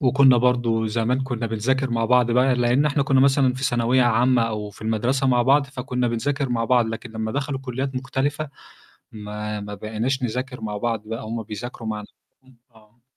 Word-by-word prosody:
وكنّا 135 -1 +5
برضه 120 -2 +2
زمان 115 +4 0
كنّا 120 -3 -3
بنذاكر 130 +4 0
مع 115 -1 0
بعض 125 0 +3
بقى 125 +2 +3
لإن 125 +4 +2
إحنا 145 -1 +1
كنّا 135 -1 +3
مثلًا 135 -2 +3
في 130 +1 -4
ثانوية 120 +1 +2
عامة 120 +1 +3
أو 105 -2 -3
في - - -14
المدرسة 120 +5 0
مع 125 -2 +3
بعض 140 +3 +3
فكنّا 125 -2 -2
بنذاكر 135 +4 -1
مع 115 -2 0
بعض، 120 -1 +3
لكن 115 +1 -6
لمّا 110 0 -3
دخلوا 140 -1 -3
كُلّيات 135 +1 -4
مختلفة 140 +3 -2 0.6
ما 105 0 -5
ما 105 0 -6
بقيناش 110 +6 -2
نذاكر 125 +1 -3
مع 105 -1 -4
بعض 115 -1 -2
بقى 115 0 -5
هُم 115 +1 -4
بيذاكروا 110 +2 -7
مع 105 -1 -3
نَفْسهم 130 +4 -19 0.2
آه. 110 +2 -23
120 Hz, 185 wpm, -23 LUFS, 110-130 Hz, 0.6 s, وكنّا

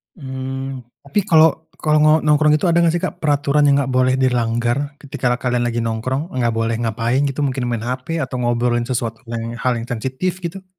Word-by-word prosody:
Mmm, 135 -2 -5 0.2
tapi 190 +8 -1
kalo 160 0 +4
kalo 155 0 +2
no 155 0 +5
nongkrong 150 0 +4
itu 155 - -3
ada 170 - +3
enggak 170 -1 +3
sih 175 - -2
Kak, - - -3
peraturan 145 -1 +2
yang 140 0 +4
gak 135 - -4
boleh 130 0 +3
dilanggar 125 +2 0
ketika 140 -3 -4
kalian 125 -1 -1
lagi 120 -1 -1
nongkrong, 130 +8 -2
enggak 120 -3 0
boleh 115 0 -1
ngapain 115 +2 0
gitu 140 +1 -2
mungkin 130 -3 -1
main 120 -2 -2
hp 130 +7 -3
atau 130 -1 -4
ngobrolin 120 0 0
sesuatu 115 -3 -2
yang 115 0 -5
hal 125 0 +1
yang 115 - -4
sensitif, 130 +10 -2
gitu? 180 +2 -6
130 Hz, 195 wpm, -19 LUFS, 120-150 Hz, 0.2 s, no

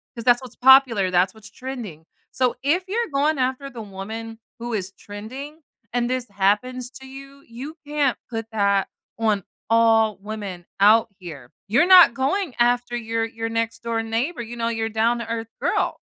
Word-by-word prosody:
'Cause 230 - -6
that's 245 0 +5
what's 250 -2 -11
popular. 255 -7 +6
That's 185 +1 +2
what's 220 0 -14
trending. 235 - -7 0.3
So 255 -1 +1
if 325 +7 +2
you're 465 +5 -1
going 290 +1 +1
after 260 +2 -1
the 240 -3 -8
woman 220 +3 -7 0.2
who 240 0 -5
is 195 -3 -3
trending, 260 +12 -9 0.3
and 240 0 0
this 255 -1 -2
happens 210 +6 0
to 265 - -11
you, 275 +1 -12
you 260 +7 -8
can't 290 -3 +1
put 225 -1 -4
that 200 -2 +2 0.3
on 215 -3 +1 0.3
all 225 -2 +4
women 200 -4 -6
out 215 +3 +6
here. 150 -9 -10 0.2
You're 245 - +3
not 365 -8 +9
going 280 +6 -1
after 245 0 +2
your 225 -1 -1
your 225 0 -5
next-door 230 0 -2
neighbor, 235 +7 -2
you 235 +1 -8
know, 230 -1 -2
your 225 -1 -2
down-to-earth 230 0 -1
girl. - - 0
230 Hz, 165 wpm, -23 LUFS, 220-260 Hz, 0.3 s, not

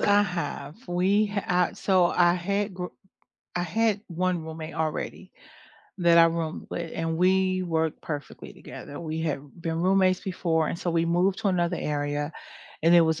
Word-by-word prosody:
I 205 0 +5
have. 170 -5 -4
We 195 +4 +2
uh, 180 0 +2
so 185 -3 +3
I 175 0 +3
had 200 +2 -2
g 180 - -3 0.7
I 175 - 0
had 210 +3 +1
1 180 -1 -1
roommate 160 0 -7
already 160 -1 -3 0.7
that 170 -1 +5
I 165 - +9
roomed 165 -1 -2
with, 170 -1 -4
and 165 0 -2
we 185 +1 +2
worked 160 -2 -1
perfectly 145 -3 -7
together. 145 - -9
We 160 -1 -4
had 155 -4 -1 0.2
been 165 0 -2
roommates 185 0 +3
before, 165 -4 0
and - - -3
so 175 - -2
we 165 0 +2
moved 180 +3 +2
to - - 0
another 175 -3 +1
area, 145 0 -2 0.5
and 165 +2 +5
there 170 -1 +7
was 160 +1 0
175 Hz, 170 wpm, -26 LUFS, 160-185 Hz, 0.7 s, I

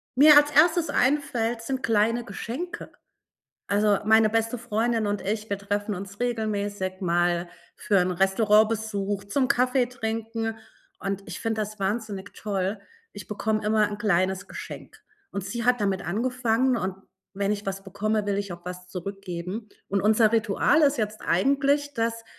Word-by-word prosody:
mir 295 +3 +8
als 290 0 +5
Erstes 325 +3 +4
einfällt, 240 -4 +1
sind 260 +3 -3
kleine 225 +2 +2
Geschenke. 295 +10 -6 0.8
Also, 205 0 +3
meine 220 0 +5
beste 225 +2 0
Freundin 230 0 0
und 205 0 -1
ich, 215 +2 -3
wir 200 - -1
treffen 205 +1 -2
uns 195 +2 -8
regelmäßig 205 -5 -2
mal 175 0 +1 0.3
für 200 - +1
'n 180 +1 +1
Restaurantbesuch, 205 +1 +2
zum 255 +6 +1
Kaffee 250 +1 +2
trinken 225 -2 -3 0.4
und 195 0 -3
ich - - -6
finde 225 -1 -1
das 210 0 -6
wahnsinnig 205 0 -3
toll. 200 0 -2 0.3
Ich 205 - -9
bekomme 215 0 -1
immer 215 0 +3
'n 205 - -5
kleines 190 -1 +1
Geschenk. - - -9 0.3
Und 200 - -4
sie 235 +3 -4
hat 245 -2 +3
damit 195 -2 0
angefangen 245 +5 +1
und 190 -2 -2 0.4
wenn 200 +1 -1
ich 210 0 -3
was 195 0 -4
bekomme, 210 +2 -1
will 200 - 0
ich 200 -3 -3
auch 175 - -10
was 180 0 -7
zurückgeben. 190 +2 -6 0.2
Und 200 0 0
unser 215 +1 +4
Ritual 225 +7 +3
ist 285 -1 +4
jetzt 215 -1 -3
eigentlich, 280 - +2
dass 230 0 -1
215 Hz, 155 wpm, -26 LUFS, 200-235 Hz, 0.8 s, mir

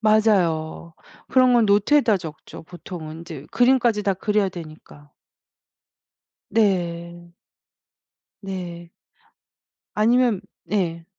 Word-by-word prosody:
맞아요. 180 -7 +1 0.3
그런 255 -1 +4
건 235 -2 +4
노트에다 210 +3 +3
적죠 160 -3 -10
보통은 165 -2 -9
인제 170 -1 -9
그림까지 245 -3 +3
다 195 -2 +1
그려야 205 +1 0
되니까. 155 -4 -12 1.4
네. 175 -5 -1 1.1
네. 175 -3 -7 1.0
아니면 230 -1 +3 0.3
예. 170 -5 -1
190 Hz, 180 characters per minute, -22 LUFS, 170-215 Hz, 1.4 s, 그런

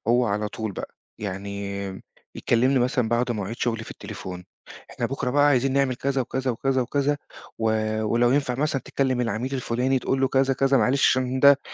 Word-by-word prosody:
هو 120 +1 +4
على 105 0 -1
طول 110 0 -5
بقى، - - -7 0.2
يعني 100 0 -5 0.3
يكلِّمني 130 +3 +2
مثلًا 125 -1 +1
بعد 120 +2 +1
مواعيد 105 +1 -4
شغلي 115 -2 -1
في - - -11
التليفون، 90 -1 -8 0.5
"إحنا - - -2
بُكرة 135 -1 -2
بقى 145 +2 +4
عايزين 135 -2 +3
نعمل 135 -1 +2
كذا 135 +1 -1
وكذا، 130 +1 -1
وكذا، 130 +2 0
وكذا 140 +3 0 0.4
و 110 - -3 0.4
ولو 120 +3 +2
ينفع 135 -2 +1
مثلًا 140 0 -1
تكلِّم 130 -2 0
العميل 120 +3 -2
الفُلاني 130 +1 0
تقول 130 +1 -1
له 135 - +3
كذا، 135 0 +2
كذا، 135 +1 +3
معلش 135 +2 +3
عشان 130 0 0
ده 140 0 +7
125 Hz, 180 wpm, -24 LUFS, 115-135 Hz, 0.5 s, ده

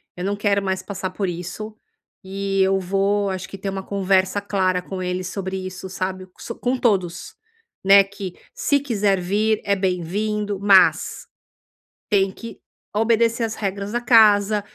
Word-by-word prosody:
eu 180 - -6
não 200 +1 -1
quero 200 -1 +1
mais 190 -1 -1
passar 190 -2 -5
por 190 +1 -3
isso, 180 +5 -6 0.5
e 195 0 -2
eu 190 0 +3
vou 195 +2 0
acho 185 -1 -4
que 195 - -8
ter 195 +1 -4
uma 195 0 -4
conversa 190 0 +1
clara 185 -3 0
com 185 0 -6
ele 180 0 -2
sobre 190 +1 -4
isso, 185 0 -7
sabe, 185 0 -4 0.4
com 255 +1 0
todos, 190 -7 -1 0.5
né, 195 0 +7
que 195 -2 -7 0.2
se 285 -1 +1
quiser 205 -8 0
vir 210 +4 +1
é 200 - +2
bem-vindo, 200 +3 -2
mas 195 -2 +4 0.8
tem 195 -2 +3
que 230 +3 -10 0.3
obedecer 230 +2 +2
as 225 - -4
regras 200 +1 -4
da 240 - 0
casa 210 -3 +5
195 Hz, 155 wpm, -22 LUFS, 185-210 Hz, 0.8 s, né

